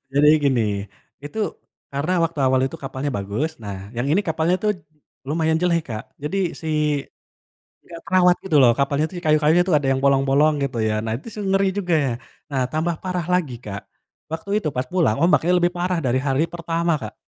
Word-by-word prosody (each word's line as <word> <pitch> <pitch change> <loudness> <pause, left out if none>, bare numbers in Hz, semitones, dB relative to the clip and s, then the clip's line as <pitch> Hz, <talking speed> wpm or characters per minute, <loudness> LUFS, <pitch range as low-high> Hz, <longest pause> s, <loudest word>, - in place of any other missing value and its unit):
Jadi 145 +1 +5 0.2
gini, 130 -4 +3 0.6
itu 150 - -8 0.6
karena 145 +6 -1
waktu 165 -3 -2
awal 130 0 +3
itu 135 - -5
kapalnya 135 +1 -3
bagus, 100 +11 -2
nah 100 -1 -5 0.2
yang 120 +3 -1
ini 195 +6 +3
kapalnya 160 +2 +1
tuh 210 - +3 0.6
lumayan 160 0 +1
jelek, 170 -2 +2
Kak. 110 0 -4 0.2
Jadi 185 +7 -2 0.2
si 160 - -5 1.2
nggak 170 -1 -10
terawat 180 0 +4
gitu 165 -6 +1
loh, 125 -3 +7
kapalnya 140 +2 +1
tuh 185 - -10
di - - -10
kayu-kayu 155 +2 +4
tuh 175 - +3
ada 140 - -4
yang 130 - 0
bolong-bolong 140 +2 +4
gitu 125 -4 -3
ya, 110 - 0
nah 110 - -2
itu 135 - -13
sih 210 - -6
ngeri 195 0 +3
juga. 180 -3 0 0.6
Nah 135 -2 0
tambah 160 +2 0
parah 180 -2 -2
lagi, 155 -9 0
Kak, 100 -1 -5 0.5
waktu 165 +5 -5
itu 155 - -2
pas 130 - -1
pulang, 165 -12 +2
ombaknya 175 0 +3
lebih 175 0 +2
parah 180 0 0
dari 130 +1 +1
hari 135 +3 +2
pertama, 170 0 -1
Kak. - - -7
155 Hz, 185 wpm, -22 LUFS, 135-175 Hz, 1.2 s, loh